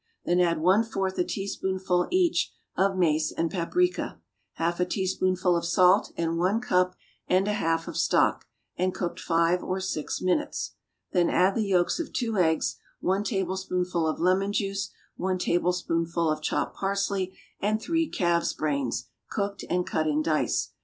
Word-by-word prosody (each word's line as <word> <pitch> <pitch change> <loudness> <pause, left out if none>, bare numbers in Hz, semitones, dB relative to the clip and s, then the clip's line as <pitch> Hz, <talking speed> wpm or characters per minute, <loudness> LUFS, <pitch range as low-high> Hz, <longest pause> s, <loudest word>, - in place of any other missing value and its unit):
Then 175 +1 +2
add 170 -2 +2
one 185 +7 +4
fourth 195 -4 -2
a - - +4
teaspoonful, 190 -2 -1
each, 360 -2 +2 0.2
of 190 0 +2
mace 155 -3 +2
and 165 0 -1
paprica, 355 - 0 0.3
half 170 +1 -1
a 180 - +3
teaspoonful 185 -1 +1
of 170 - 0
salt 180 +1 +4
and 165 0 -1
one 190 +6 +2
cup 185 -6 +1 0.3
and 185 +2 +3
a 210 - +1
half 165 -4 0
of - - -6
stock, - - +2 0.3
and 185 +1 0
cook 175 -2 -3
five 170 +1 +2
or 185 +1 -2
six 185 -5 -3
minutes. 185 +11 -1 0.4
Then 175 -2 +3
add 185 +2 +3
the 215 -1 0
yolks 180 - +2
of 335 - -4
two 225 -4 -1
eggs, 160 -3 +2 0.2
one 190 +2 +1
tablespoonful 185 -4 -1
of 155 - -2
lemon 190 +3 +2
juice, 195 -1 -1 0.3
one 185 0 0
tablespoonful 170 -2 0
of 155 - -2
chopped - - -1
parsley 195 -1 -1 0.2
and 215 +2 +1
three 330 +5 0
calves' 170 -2 +1
brains, 140 -5 -1 0.2
cooked, 200 -1 -3
and 180 0 +1
cut 155 0 0
in 155 0 +1
dice. 155 -2 0
185 Hz, 160 wpm, -27 LUFS, 170-195 Hz, 0.4 s, one